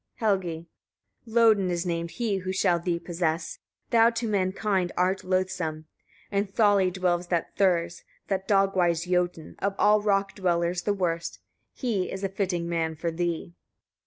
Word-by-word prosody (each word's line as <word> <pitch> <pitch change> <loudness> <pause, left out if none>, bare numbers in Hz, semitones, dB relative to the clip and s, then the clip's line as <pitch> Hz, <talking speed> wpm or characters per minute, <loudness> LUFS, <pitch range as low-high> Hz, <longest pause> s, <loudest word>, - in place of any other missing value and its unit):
Helgi. 185 -7 -1 0.6
25. 225 - -13
Lodin 220 -5 +5
is 175 0 -1
named 170 -1 -2
he 220 0 -1
who 185 0 -3
shall 185 -2 +2
thee 170 0 -1
possess, 170 -1 -2 0.3
thou 230 -1 +6
to 230 0 -3
mankind 190 -2 0
art 185 +2 +1
loathsome. 180 -4 -1 0.5
In 200 0 0
Tholley 200 -2 +3
dwells 180 -1 0
that 170 -2 -2
Thurs, 175 -3 +1 0.2
that 195 -1 -2
dog 195 -1 +3
wise 170 -2 +2
Jotun, 180 -2 -1
of 200 0 -1
all 210 0 +4
rock 195 -1 +1
dwellers 175 -2 0
the 205 - 0
worst: 170 -3 -2 0.4
he 220 -8 -1
is 190 +1 -5
a 195 - 0
fitting 185 -3 -2
man 165 -1 -1
for 165 +2 -2
thee. 170 0 -3
185 Hz, 160 wpm, -27 LUFS, 170-195 Hz, 0.6 s, thou